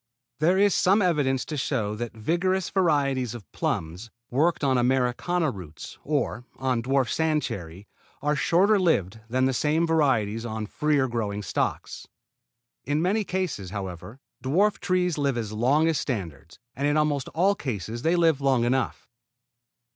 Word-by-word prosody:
There 175 +5 +3
is 200 0 +4
some 195 +3 +3
evidence 145 -7 +1
to 155 - -5
show 120 -7 -1
that 115 +1 -6
vigorous 180 - 0
varieties 140 - +1
of 110 -5 -9
plums 85 +8 -3 0.2
worked 155 +6 +1
on 135 -2 +3
Americana 130 +6 +1
roots 85 -7 -10
or 140 -4 -1
on 130 -3 -1
dwarf 135 +1 +1
sand 155 +1 +1
cherry 95 -3 -6 0.3
are 150 +1 0
shorter 195 +8 +3
lived 110 - +1
than 130 +2 +1
the 130 - +1
same 155 +6 +1
varieties 125 -10 +1
on 110 -2 -4
freer 145 +3 +1
growing 105 -4 -3
stocks. 90 - -3 0.8
In 145 +3 0
many 195 +6 +1
cases, 180 - -3
however, 95 +4 -7 0.2
dwarf 195 +10 +2
trees 180 -4 0
live 140 -3 0
as 110 -3 -3
long 130 +9 +2
as 165 -2 +1
standards; 85 - -5 0.2
and 140 +3 0
in 145 +1 +2
almost 145 -3 +1
all 190 +5 +3
cases 120 - -5
they 165 +5 +2
live 165 -5 +3
long 130 -4 +2
enough. 130 +2 -1
135 Hz, 155 wpm, -26 LUFS, 115-160 Hz, 0.8 s, is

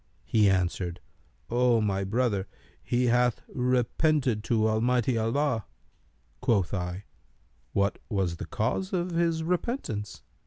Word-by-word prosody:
He 105 -3 +4
answered, 90 -1 0 0.5
'O 120 -1 +4
my 100 -2 0
brother, 105 -1 0 0.3
he 125 +1 0
hath 125 0 +2
repented 125 -1 +1
to 110 -2 +2
Almighty 120 +3 +2
Allah.[FN#294]' 115 +1 +1 0.8
Quoth 100 -6 +1
I, 90 0 -3 0.7
'What 100 0 +1
was 95 -6 -1
the - - -6
cause 130 - -1
of 180 0 0
his 165 -1 +1
repentance?' 170 - -3
115 Hz, 115 wpm, -28 LUFS, 100-130 Hz, 0.8 s, He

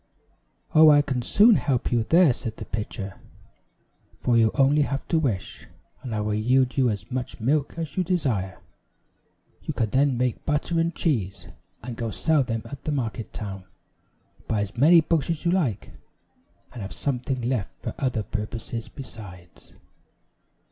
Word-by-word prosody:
"Oh, 155 0 +8
I 145 -1 +6
can 130 -3 -2
soon 210 - +5
help 130 -4 -1
you 120 -1 +3
there," 165 +2 +5
said 115 -2 -6
the - - -7
pitcher, 105 -2 -5 1.0
"for 120 - +1
you 115 -1 +5
have 140 - -8
only 140 +2 +4 0.2
to 165 - +3
wish, 115 -11 -3 0.3
and 120 -4 -5
I 105 - -1
will 105 0 -1
yield 125 +4 +2
you 130 -3 +3
as 105 +2 -5
much 125 0 -4
milk 140 +5 0
as 160 -4 -5
you 185 - +1
desire. 125 - -1 1.0
You - - -5
can 110 -3 -1
then 135 0 +2
make 125 -1 -1
butter 155 +3 0
and 165 0 0
cheese, 100 - -1 0.3
and 120 0 -6
go 115 -1 -3
sell 155 +6 +2
them 115 -3 -2
at 140 -2 -9
the 155 - -1
market 120 -5 -3
town; 95 -3 -6 0.8
buy 110 -2 0
as 105 0 -4
many 160 +7 +6
books 160 -2 0
as 165 0 -2
you 170 - +3
like, 155 - -1 0.8
and 120 - -7
have 95 - -6
something 130 -1 -2
left 120 -4 -1
for - - -3
other 125 -5 0
purposes 110 +2 -5
besides." 95 -9 -12
125 Hz, 165 wpm, -25 LUFS, 110-150 Hz, 1.0 s, Oh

